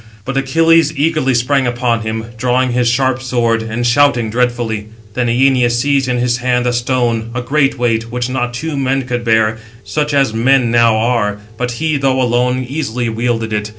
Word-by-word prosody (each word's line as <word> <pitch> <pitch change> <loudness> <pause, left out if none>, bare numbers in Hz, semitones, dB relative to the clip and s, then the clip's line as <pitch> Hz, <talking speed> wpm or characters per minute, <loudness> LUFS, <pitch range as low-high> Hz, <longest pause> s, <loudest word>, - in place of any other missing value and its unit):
But 135 - -4
Achilles 160 +3 +3
eagerly 150 -3 +1
sprang 130 +2 +1
upon 120 -1 0
him, 110 0 -4
drawing 125 +2 0
his 120 0 +1
sharp 130 +1 +1
sword, 120 -3 0
and 115 +2 -3
shouting 120 -3 +2
dreadfully. 120 -3 -1 0.3
Then 125 +1 -1
Æneas 125 0 +2
seized 135 +2 +1
in 125 -1 0
his 120 0 0
hand 125 0 0
a 125 - +1
stone, 120 -2 -1
a 125 - -1
great 140 +1 +1
weight, 115 -2 -1
which 120 0 -2
not 125 -1 -2
two 155 +4 -4
men 135 0 0
could 120 -1 -3
bear, 110 -1 +1 0.2
such 150 0 -2
as 135 -5 +2
men 125 +1 +2
now 115 -2 +4
are; 110 -3 0 0.2
but 125 +1 -3
he, 155 +4 -1
though 135 -1 +1
alone, 125 +1 0
easily 125 -4 -3
wielded 115 -1 -2
it. 105 0 -2
125 Hz, 185 wpm, -15 LUFS, 115-135 Hz, 0.3 s, now